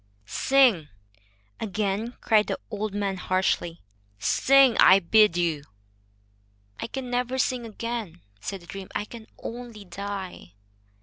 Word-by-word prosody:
"Sing," 230 - +3 0.7
again 215 +2 -2
cried 215 -2 +3
the - - -2
old 210 -1 -3
man, 200 -2 -1
harshly; 180 -2 -1 0.3
"sing, 270 - +4
I 190 - +8
bid 195 0 +4
you." 165 -4 0 1.2
"I - - -3
can 255 0 -6
never 250 +1 -1
sing 250 -2 0
again," 225 -5 -5 0.2
said 195 - -6
the - - -15
dream. 195 +1 -8
"I 205 - -1
can 225 0 -11
only 230 -3 -8
die." 190 - -7
210 Hz, 125 wpm, -26 LUFS, 185-235 Hz, 1.2 s, I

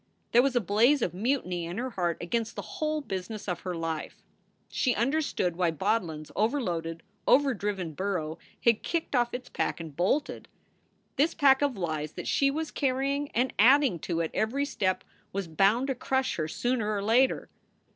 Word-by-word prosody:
There 240 - +7
was 265 0 +1
a - - +5
blaze 230 +7 +3
of 170 - -1
mutiny 180 -5 -1
in 175 +3 -5
her 255 +2 -3
heart 175 -5 -1
against 225 +6 -2
the - - -5
whole 310 0 -2
business 205 -2 -5
of 180 - -2
her 180 -2 -4
life. 165 -2 -4 0.4
She 250 -3 0
understood 240 - 0
why 175 -1 +2
Bodlin 170 -1 -1
s 155 - -13
over 225 +8 +2
loaded, 165 -6 -3 0.2
overdriven 205 - +2
burro 170 -3 -2 0.2
had 235 -2 +4
kicked 330 -4 -2
off 240 -1 +2
its 250 +1 -6
pack - - -2
and 160 -4 -8
bolted. 195 - 0 0.7
This 310 +4 +2
pack 270 -2 +5
of 280 -6 +1
lies 155 -4 -3
that - - -6
she 275 - +3
was 310 +3 -3
carrying 275 +1 0
and 250 +2 +1
adding 255 - +5
to 170 +1 -1
at 160 - -4
every 265 +6 0
step 185 -9 -1 0.3
was 195 -2 -2
bound 195 +10 +3
to 270 - 0
crush 265 +1 -1
her 155 -2 -1
sooner 225 +3 -1
or 200 - -2
later. 245 +5 +2
215 Hz, 180 wpm, -28 LUFS, 175-265 Hz, 0.7 s, There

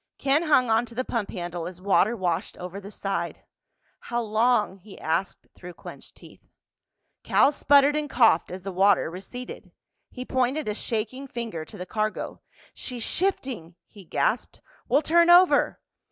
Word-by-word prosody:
Ken 280 +3 +2
hung 275 -8 +3
on 225 +2 +2
to 235 - -12
the 255 +2 -2
pump 225 -4 -2
handle 175 -3 -5
as 180 0 -9
water 200 +4 +2
washed 180 +1 -2
over 180 +2 -7
the 200 - -9
side. 195 -4 -4 0.6
"How 240 - -3
long?" 220 -2 +1
he 195 +2 -14
asked 165 +4 -2
through 180 -1 -11
clenched - - -11
teeth. - - -17 0.7
Cal 280 - +4
sputtered 285 0 +4
and 300 -1 -2
coughed 225 -11 +4
as 185 0 -7
the 195 - -4
water 190 -2 +3
receded. 245 +8 -9 0.4
He 250 -1 -8
pointed 260 +3 0
a 210 - 0
shaking 230 +5 -4
finger 230 -10 -5
to - - -12
the 180 - -6
cargo. 215 +3 -3 0.3
"She's 245 -3 -6
shifting!" 255 - -2
he 200 - -15
gasped. 170 - -1 0.3
"We'll 285 +4 +3
turn 340 +3 +4
over!" 355 +1 +5
220 Hz, 160 wpm, -25 LUFS, 185-260 Hz, 0.7 s, over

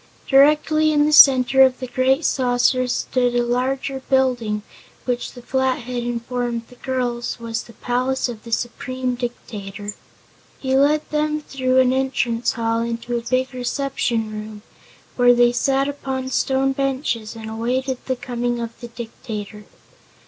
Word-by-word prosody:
Directly 300 +3 +4
in 295 -1 +3
the 305 - +1
center 265 -2 +7
of 260 -1 +5
the 255 - -4
great 260 +4 +1
saucer 255 0 +2
stood 245 0 0
a 240 - +3
larger 265 +2 -1
building 245 -6 +1 0.4
which 245 -1 -2
the 245 - -12
Flathead 255 -2 -1
informed 240 0 -3
the 250 - -15
girls 245 -2 -2
was 230 0 -3
the 230 - -14
palace 250 +4 -1
of 235 -3 -8
the 230 - -10
Supreme 255 +2 -2
Dictator. 205 -4 -6 0.6
He 265 -1 -1
led 295 +3 +3
them 305 0 0
through 260 -3 -1
an 255 -1 +4
entrance 245 -3 0
hall 230 0 0
into 235 +1 -3
a 235 - -1
big 255 +2 -1
reception 245 -3 -1
room, 215 0 -8 0.5
where 245 -1 +6
they 240 0 +5
sat 270 +2 +1
upon 265 -2 -4
stone 265 +1 +1
benches 265 -5 -2
and 220 -1 -8
awaited 250 +4 -2
the 260 - 0
coming 240 -1 -3
of 230 -1 -4
the 240 - -7
Dictator. 220 -3 -8
250 Hz, 150 wpm, -21 LUFS, 235-265 Hz, 0.6 s, center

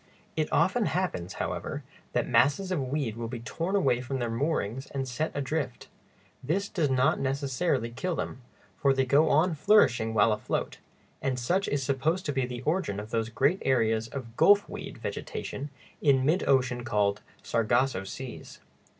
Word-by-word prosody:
It - - -1
often - - +2
happens, 90 +2 -2
however, - - -4 0.3
that - - +1
masses 165 +9 +3
of 175 -6 0
weed 130 -5 -2
will 115 0 -4
be 120 0 -5
torn 170 +10 -2
away 130 -10 +2
from 135 +1 -3
their 120 -2 -2
moorings 130 -1 -1
and 135 -1 -4
set 155 +6 -2
adrift. 140 -2 -3 0.5
This 190 +9 -1
does 160 -7 0
not 130 0 +2
necessarily 135 -1 0
kill 165 +9 -2
them, 130 -2 -4 0.4
for 140 -1 +4
they 135 0 +2
go 145 +4 +4
on 165 +4 +3
flourishing 135 - +3
while 105 +1 +5
afloat, 105 - -3 0.4
and 130 -2 -1
such 180 +11 0
is 140 -1 0
supposed 145 +7 0
to 145 - -1
be 135 -2 0
the 125 0 -6
origin 155 - 0
of 105 +1 -8
those 115 -1 0
great 140 - +2
areas 115 -3 +2
of 120 -2 -7
"gulfweed" 205 0 +3
vegetation 145 +2 -5 0.3
in 135 -3 +4
mid 165 +6 +2
ocean 130 -2 +2
called 105 -4 +1 0.2
"sargasso 115 -1 +1
seas." 125 +5 -8
130 Hz, 165 wpm, -28 LUFS, 120-150 Hz, 0.5 s, while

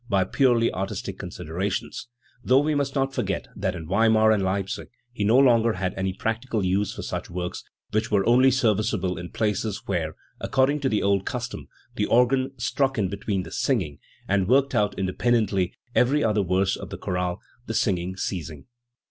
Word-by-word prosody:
283 100 - +2
by 95 0 -1
purely 120 -4 +3
artistic 95 +1 -4
considerations, 95 +8 -4 0.4
though 130 +2 +4
we 150 +2 +1
must 140 -1 -1
not 135 -1 0
forget 100 -5 -2
that 95 -2 -2
in 80 -2 -7
Weimar 110 +3 +4
and 105 -2 +2
Leipzig 95 0 -2 0.2
he 110 -4 -3
no 110 +5 +4
longer 115 -4 +5
had 95 -1 -2
any 95 0 -2
practical 110 +1 -2
use 95 +2 +1
for - - -6
such - - -4
works, 90 0 -4 0.3
which 110 +1 0
were 100 -3 +2
only 125 +3 +5
serviceable 105 -7 +1
in 90 0 -7
places 105 -1 -2
where, 80 -5 -2 0.2
according 135 +3 +1
to 135 -2 0
the 105 - 0
old 100 -1 +2
custom, 125 -1 -4 0.3
the 105 - +1
organ 130 +2 +3
"struck 130 +3 0
in 100 -4 +1
between 100 -1 -2
the - - -10
singing" 120 - -1 0.3
and 95 -1 +1
worked 135 +3 +3
out 105 -1 +1
inde 95 -1 -2
pendently 105 -6 +2 0.2
every 140 +4 +3
other 105 -2 +2
verse 95 +1 +1
of - - -8
the - - -6
chorale, 90 -1 -2 0.3
the 115 - -3
singing 95 -2 0
ceasing*. 80 -6 -4
105 Hz, 180 wpm, -25 LUFS, 95-120 Hz, 0.4 s, longer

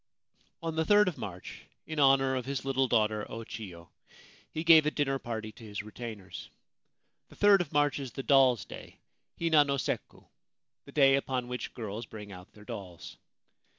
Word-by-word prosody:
On 165 -1 -3
the 160 - +3
3rd 210 +4 +5
of 175 - -9
March, 95 -3 -8 0.2
in 155 -1 -5
honour 135 -1 +4
of 130 0 -4
his 140 -1 -3
little 135 -1 +1
daughter 110 -3 +1
O 115 - -6
Chio, 90 -7 -9 0.6
he 160 - -4
gave 160 -2 +7
a - - +5
dinner 135 -3 -1
party 110 -3 -5
to 110 - -16
his 105 -1 -6
retainers. 110 -4 -8 0.8
The - - -16
3rd 205 -2 +5
of 165 - -5
March 145 -1 +2
is 135 -3 -6
the 135 - -5
Dolls' 130 -4 +4
Day - - -11 0.4
(Hina 160 -3 +5
no 140 -1 -1
sekku) - - -4 0.3
— - - -60
the - - -12
day 135 -2 +5
upon 130 -2 -2
which 125 0 -5
girls 110 0 -6
bring 105 -2 -10
out 90 -1 -12
their 105 0 -16
dolls. 100 -7 -9
130 Hz, 185 wpm, -30 LUFS, 110-145 Hz, 0.8 s, gave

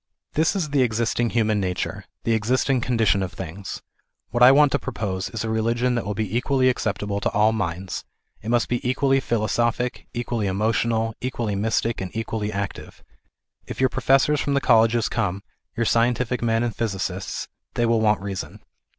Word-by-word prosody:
This 160 +5 +2
is 165 -7 -2
the 140 -2 +3
existing 115 0 +1
human 110 -3 +1
nature, 90 -2 -3 0.2
the 115 - +1
existing 125 +4 +1
condi 115 -2 +1
tion 100 -1 +3
of 95 -1 -3
things. 95 +2 -7 0.5
What 120 - -1
I 125 +1 +10
want 145 +1 +5
to - - +1
propose, 95 -3 -3
is 115 -1 -4
a - - -2
religion 115 +3 +1
that 120 -4 -2
will 105 - -2
be 110 -1 -2
equally 130 +1 +2
acceptable 105 -4 -1
to - - 0
all 105 +1 +4
minds; 95 -3 -3 0.4
it 110 - -6
must 120 0 +2
be 120 - -1
equally 135 +1 +2
philosophic, 120 +1 -1
equally 120 -3 -2
emotional, 110 +3 0
equally 120 -4 -2
mystic, 110 +2 0
and 95 - -4
equally 110 -1 -2
active. 100 -1 -6 0.6
If - - -7
your 130 0 +4
professors 135 +4 +3
from 140 - 0
the - - +4
colleges 115 -2 +4
come, 100 -3 -2 0.3
your 115 - +1
scientific 120 +2 +1
men 115 0 +1
and 120 -3 -2
physicists, 100 -5 -3 0.3
they 120 - +2
will 115 -1 +2
want 105 -2 +2
reason. 100 -2 -6
115 Hz, 175 wpm, -23 LUFS, 105-125 Hz, 0.6 s, I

